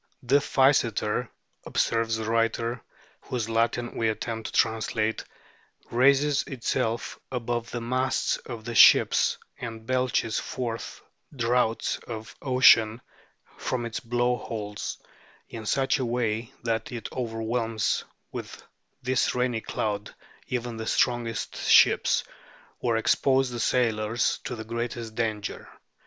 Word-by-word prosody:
" - - -39
The 140 - +8
Physeter," 125 -5 +2 0.3
observes 115 0 0
this 110 - -4
writer, 115 +1 0 0.4
whose 120 -4 -3
Latin 115 +1 0
we 115 -1 +1
attempt 110 0 -3
to - - -7
translate, 110 -1 +1 0.4
" - - -32 0.3
raises 140 +3 +4
itself 115 -3 -2
above 120 -2 -2
the 120 - -4
masts 130 +2 0
of 115 -3 -9
the 120 - -4
ships - - +6 0.2
and 115 -2 -7
belches 125 -3 0
forth 115 -3 -5 0.3
draughts 120 -2 +1
of 110 -1 -7
ocean 120 -4 +5 0.6
from 120 -2 -2
its 115 -1 -4
blow 120 +1 0
holes 105 -4 -5 0.5
in 110 -2 -7
such 135 +2 +2
a 130 - 0
way 115 -1 -1
that 115 -1 -1
it 120 -3 -5
overwhelms 115 -2 -1 0.3
with - - -7 0.4
this 130 0 +1
rainy 125 -2 0
cloud 105 -1 -3 0.3
even 120 -2 -3
the 110 0 -5
strongest 120 -3 0
ships, - - +5 0.6
or 115 -2 +1
exposes 130 +3 +2
the 120 - -4
sailors 115 -1 +1
to 125 - -3
the 110 - -6
greatest 115 0 -4
danger." 110 -2 -3
115 Hz, 125 wpm, -27 LUFS, 110-125 Hz, 0.6 s, The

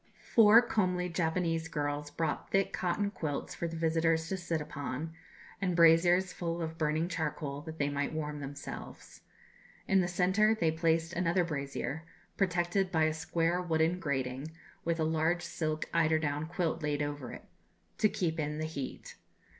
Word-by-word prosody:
Four 225 +1 +8
comely 180 -6 0
Japanese 165 -1 0
girls 145 -2 -2
brought 160 +1 -2
thick 195 0 +1
cotton 200 +3 0
quilts 155 -7 -3
for 170 - -3
the 165 - -6
visitors 165 0 +1
to 190 - -1
sit 170 -3 -2
upon, 150 +1 -5 0.5
and 180 -3 0
braziers 175 +2 +5
full 170 -1 -3
of 160 -1 -4
burning 155 +1 +1
charcoal 155 -4 -3
that 160 0 -8
they 145 - +1
might 145 0 -1
warm 150 -1 -3
themselves. 140 0 -8 0.7
In 195 -1 +4
the 175 - 0
centre 190 +5 +3
they 160 -1 +3
placed 165 +1 +1
another 175 +1 +2
brazier, 140 -1 -3 0.3
protected 180 0 +1
by 160 -3 +3
a 155 0 +2
square 165 +2 0
wooden 165 0 +1
grating, 135 -1 -2 0.3
with 170 0 0
a - - +2
large 160 +2 +1
silk 155 -3 -2
eider 160 -1 +3
down 150 0 -2
quilt 170 -1 -1
laid 150 -1 0
over 145 -4 -4
it, - - -10 0.5
to 215 - +5
keep 165 -4 -1
in 150 0 -2
the 155 - -2
heat. 140 -4 -6
165 Hz, 160 wpm, -31 LUFS, 150-175 Hz, 0.7 s, Four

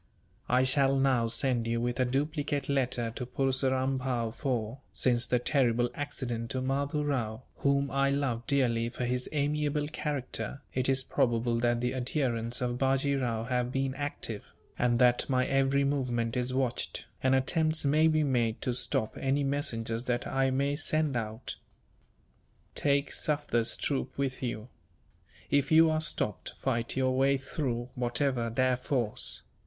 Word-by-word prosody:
"I 125 +1 +4
shall 135 +1 +3
now 135 -4 +2
send 120 0 0
you 115 0 0
with 120 +2 -2
a 130 - +3
duplicate 145 +2 -1
letter 125 -4 0
to - - -4
Purseram 130 +1 0
Bhow 120 -3 -1
for, 120 0 -2
since 120 -2 +3
the 125 - +2
terrible 120 -2 +2
accident 120 -5 -4
to 130 - -2
Mahdoo 140 +3 -1
Rao, 125 -5 -2
whom 140 0 +1
I 140 0 +2
loved 135 -4 -1
dearly 120 -5 +2
for 125 +1 -4
his 125 +1 -2
amiable 150 0 0
character, 140 -2 -4
it 130 0 0
is 135 0 +2
probable 120 -3 +1
that 120 0 +1
the 125 +1 0
adherents 125 -2 -1
of 125 0 -1
Bajee 135 +1 +2
Rao 115 -3 -1
have 125 0 -1
been 135 0 -1
active; 135 -6 -4 0.4
and 120 -1 +3
that 125 +1 +3
my 130 -1 +2
every 135 +1 +2
movement 125 -5 0
is 125 0 -1
watched, 130 -2 -2 0.2
and 130 0 +3
attempts 155 +4 +1
may 155 +3 +4
be 155 -1 +3
made 120 -5 +1
to 125 - 0
stop 120 -3 0
any 135 +2 +1
messengers 115 -5 -1
that 120 -1 -1
I 135 0 +1
may 140 +2 0
send 155 -1 0
out. 110 0 -3 1.2
Take 140 -1 +1
Sufder's 145 -6 0
troop 135 -2 -2
with 135 -2 -2
you. 120 -2 -4 0.8
If 140 +1 +2
you 160 0 +6
are 155 0 0
stopped, 150 -9 -1
fight 120 -2 -1
your 130 -1 +2
way 135 +1 +3
through, 130 -3 -3
whatever 125 -1 0
their 130 +2 +2
force. 125 -3 -2
130 Hz, 155 wpm, -30 LUFS, 120-140 Hz, 1.2 s, you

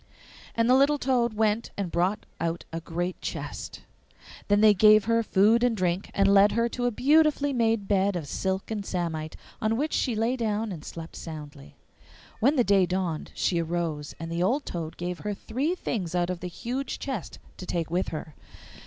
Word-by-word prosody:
And 230 0 +2
the 250 - +5
little 280 +3 +4
toad 245 -4 +1
went 220 +1 +1
and 195 -4 -3
brought 180 +4 0
out 170 0 -2
a 165 - -3
great 175 +2 -4
chest. - - -6 0.6
Then 205 0 +4
they 215 0 +7
gave 215 +1 +6
her 230 0 +3
food 220 +2 +3
and 240 -3 +2
drink, 180 +1 -1
and 195 0 +4
led 200 +1 +6
her 230 +2 +2
to 245 +1 -1
a - - +1
beautifully 290 +3 +3
made 225 -4 +1
bed 200 -1 +2
of 165 -5 -4
silk 190 +7 -2
and 210 -2 -2
samite, 165 -5 -3 0.3
on 220 +1 +1
which 300 +4 -1
she 245 -5 +1
lay 225 +4 +1
down 220 -2 -1
and 160 -5 -7
slept 165 0 -8
soundly. 150 - -9 0.6
When 275 +7 +3
the 250 - +4
day 195 -4 +4
dawned 180 -4 -2
she 170 -2 +1
arose, 165 -3 -3
and 165 +1 -6
the 170 +1 -1
old 260 +10 +1
toad 165 -2 -5
gave 175 0 -4
her 210 -1 -3
three 270 - -2
things 180 - -3
out 175 0 +1
of 180 - -4
the 180 - -5
huge 245 +9 -4
chest 260 - -5 0.2
to 185 - -8
take 165 -2 -2
with 180 +2 0
her. 155 -1 -6
200 Hz, 195 wpm, -27 LUFS, 175-230 Hz, 0.6 s, they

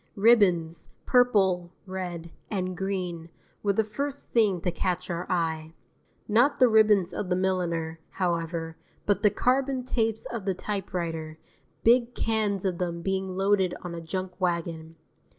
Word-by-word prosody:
Ribbons, 185 -7 +3 0.2
purple, 195 -8 +3 0.2
red, 175 -3 -5 0.2
and 185 -3 -2
green, 180 -3 -3 0.3
were 200 -1 +1
the 220 - +2
first 280 +7 -5
thing 210 -6 +3
to 180 - 0
catch 180 +1 -2
our 170 +2 -4
eye. 160 -2 -1 0.5
Not 240 +7 +3
the 255 - +6
ribbons 215 -5 +4
of 195 - -3
the 180 - +2
milliner, 170 -3 -1
however, 165 -2 -2 0.3
but 205 -1 +2
the 210 - +5
carbon 260 +4 +1
tapes 225 -3 -1
of 230 -5 -5
the 195 -2 0
typewriter, 170 -6 -4 0.5
big 240 +1 +4
cans 210 -3 0
of 180 -2 -1
them 170 -2 -3
being 190 0 -2
loaded 195 -2 +2
on 175 -1 -5
a 170 - -5
junk 185 +2 -5
wagon. 165 -2 -2
185 Hz, 145 wpm, -27 LUFS, 170-210 Hz, 0.5 s, the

